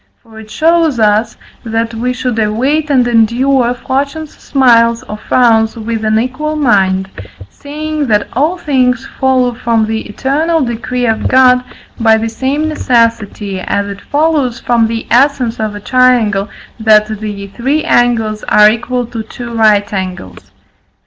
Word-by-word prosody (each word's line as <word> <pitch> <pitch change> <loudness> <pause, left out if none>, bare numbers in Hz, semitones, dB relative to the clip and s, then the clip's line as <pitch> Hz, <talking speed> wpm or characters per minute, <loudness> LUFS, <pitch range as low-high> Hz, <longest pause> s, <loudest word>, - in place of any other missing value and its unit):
For 220 -1 -14
it 215 -1 -12
shows 320 -2 +1
us, 215 +2 +1 0.3
that 225 0 -2
we 240 +3 -2
should 250 -2 -3
await 260 +9 0
and 255 -4 +2
endure 240 +2 +2
fortune's 280 +5 -4
smiles 235 -4 +2
or 210 - -7
frowns 225 0 +2
with 225 0 -4
an 215 0 +1
equal 260 +6 -2
mind, 190 -9 +1 0.4
seeing 305 0 -5
that 210 -2 +1
all 305 +8 0
things 255 -6 0
follow 255 -2 +2
from 230 -2 0
the 220 0 -3
eternal 310 +8 0
decree 245 0 -2
of 225 -1 0
God 255 -1 +4 0.4
by 225 -1 +4
the 225 +1 -2
same 270 +7 -2
necessity, 230 -8 -1
as 200 +2 -2
it 200 0 -8
follows 290 -5 0
from 235 -2 +1
the 225 0 -4
essence 250 -2 +2
of 215 -1 -3
a - - -6
triangle, 225 -4 +2 0.3
that 215 -1 +4
the 210 -2 -6
three 270 +9 -1
angles 225 -3 +1
are 210 0 +5
equal 245 +2 -3
to 230 -1 -6
two 235 +2 -9
right 210 -2 +2
angles. 180 - -6
235 Hz, 150 wpm, -13 LUFS, 220-265 Hz, 0.4 s, are